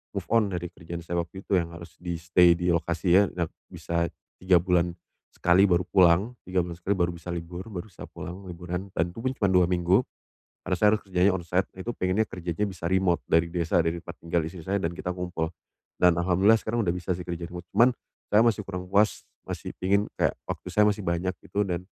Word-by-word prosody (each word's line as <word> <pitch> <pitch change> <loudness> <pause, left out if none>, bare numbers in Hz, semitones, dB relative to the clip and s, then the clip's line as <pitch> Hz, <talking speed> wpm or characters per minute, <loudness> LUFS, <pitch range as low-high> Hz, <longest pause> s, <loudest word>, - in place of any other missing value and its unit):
move - - -2
on 115 -3 +4
dari 90 -2 -4
kerjaan 85 0 -8
saya 85 0 -2
waktu 90 +3 -6
itu 95 - +2
yang 85 0 -5
harus 85 -1 -12
di-stay 85 0 +3
di 90 0 0
lokasi 85 +2 +3
ya 100 - +6
nak 85 -3 -2 0.2
bisa 85 0 -2 0.3
3 90 -2 +4
bulan 90 -2 +1 0.4
sekali 90 +3 +4
baru 90 0 +3
pulang, 95 +6 +4
3 90 -1 +1
bulan 85 -1 -6
sekali 100 +4 0
baru 90 -1 +1
bisa 85 +1 -10
libur, 85 +4 -6
baru 95 -2 -6
bisa - - -10
pulang 95 +2 -8
liburan, 90 +2 -5
dan 85 +1 0
itu 90 - -10
pun 130 +3 -1
cuma 100 -3 +1
2 90 -2 +5
minggu. 90 +5 +3 0.6
Karena 90 0 0
saya 105 - +4
harus 105 - -2
kerjanya 95 +1 +3
on 95 - -2
site, 90 +2 +1
itu 95 +5 -4
pengennya 95 +4 +1
kerjanya 90 +3 -3
bisa 90 -3 -10
remote 95 -1 +1
dari 80 +1 +3
desa 85 0 +1
dari 80 +1 0
tempat 85 0 -10
tinggal 85 -1 0
istri 85 +2 -7
saya 95 +4 -1
dan 85 -2 -2
kita 90 - -6
ngumpul. 90 -3 -2 0.5
Dan 90 -1 +5
alhamdulillah 95 +5 +4
sekarang 115 +1 -1
udah 85 - +1
bisa 90 0 -2
sih 90 - -7
kerja 85 -1 -4
remote. 90 0 -8
Cuman, 120 +2 +6 0.4
saya 105 - +5
masih 115 -2 +2
kurang 90 -1 -5
puas 105 +2 +3 0.2
masih - - -5
pengen 100 +2 +2 0.2
kayak - - +2
waktu - - -5
saya 105 - +4
masih 105 0 -1
banyak 85 +2 0 0.2
gitu 105 0 0
dan 90 0 -3
90 Hz, 215 wpm, -27 LUFS, 85-95 Hz, 0.6 s, ya